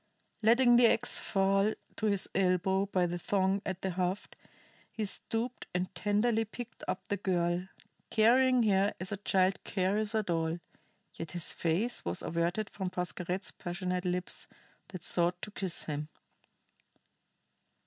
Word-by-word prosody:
Letting 240 +2 +6
the 240 -1 +7
ax 245 - +1
fall 195 +1 +2 0.2
to 220 - -2
his 200 -2 +1
elbow 190 +1 +2
by 185 -2 +1
the 175 0 -3
thong 195 +2 +1
at 190 -1 -4
the 190 - 0
haft, 180 +2 -2 0.6
he 220 - -2
stooped 230 +5 -2
and 180 +1 -1
tenderly 210 +4 +1
picked 230 +2 -9
up 190 0 -3
the 205 - -1
girl, 175 -1 0 0.4
carrying 250 +3 +5
her 200 -1 +2
as 185 +2 -4
a 205 - -2
child 190 -1 +1
carries 205 +3 0
a 215 - +2
doll; 165 -2 -1 0.5
yet 165 - -7
his 175 -2 +2
face 180 +9 0
was 85 +1 -1
averted 170 +6 -1
from 190 -2 -3
Pascherette's 180 +1 -3
passionate 180 0 -3
lips 180 0 -1 0.4
that 185 -3 -9
sought 175 0 +1
to 210 - -5
kiss 190 -4 -3
him. 150 0 -4
190 Hz, 145 wpm, -31 LUFS, 180-215 Hz, 0.6 s, the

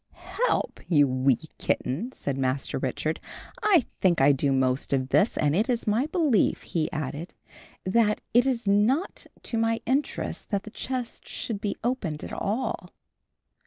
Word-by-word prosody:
"'Help,' 380 +8 -1
you 145 -5 +5
wee 130 -1 +2 0.2
kitten!" 165 - -1
said 140 - -3
Master 135 0 -1
Richard; 145 +5 -2 0.4
"I 405 - +4
think 175 -3 +3
I 135 +2 +6
do 140 0 +1
most 130 +1 +1
of 130 -1 0
this; 205 - +3
and 150 0 +2
it 215 +7 +1
is 240 -2 0
my 225 +6 +2
belief," 310 - +2
he 160 -2 -1
added, 155 +1 -5 0.5
"that 210 +2 +3
it 245 +3 +5
is 240 -5 -1
not 220 - +2 0.2
to 230 - -2
my 225 0 +1
interest 275 +4 -1
that 200 -2 -1
the 215 - -10
chest 250 0 -4
should 225 -5 -4
be 205 - -2
opened 215 - -2
at - - -7
all." 215 -4 -2
205 Hz, 160 wpm, -26 LUFS, -, 0.5 s, I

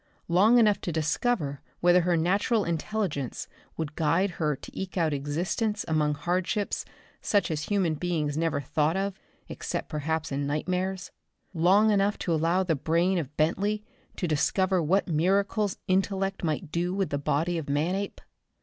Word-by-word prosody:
Long 200 +8 +5
enough 215 -4 +4
to 175 - -3
discover 155 - 0 0.2
whether 175 +1 +5
her 175 0 +2
natural 200 +6 +2
intelligence 170 - -2 0.3
would 160 -2 -3
guide 170 +5 +2
her 150 -2 +2
to - - -12
eke 190 0 -5
out 160 -3 +2
existence 175 +10 -1
among 150 -2 +1
hardships 180 +6 -1 0.4
such 200 -4 +1
as 155 -1 -2
human 190 -6 +1
beings 155 -3 -1
never 160 -2 0
thought 155 +5 0
of, 195 0 -2 0.3
except - - -4
perhaps 155 0 -2
in 140 +1 -1
nightmares? 180 +5 -2 0.4
Long 190 +6 +4
enough 205 0 +2
to 170 - -1
allow 165 +4 +2
the 175 -3 +1
brain 170 +5 +1
of 150 -2 -6
Bentley 200 +7 +1 0.3
to 180 - -2
discover 185 +4 +1
what 185 +6 +2
miracles 195 +5 +1
intellect 195 0 0
might 155 0 -2
do 175 +2 -1
with 195 -2 -1
the 145 - 0
body 165 +5 0
of 145 - -7
Manape? 180 +8 -1
175 Hz, 155 wpm, -27 LUFS, 155-195 Hz, 0.4 s, Long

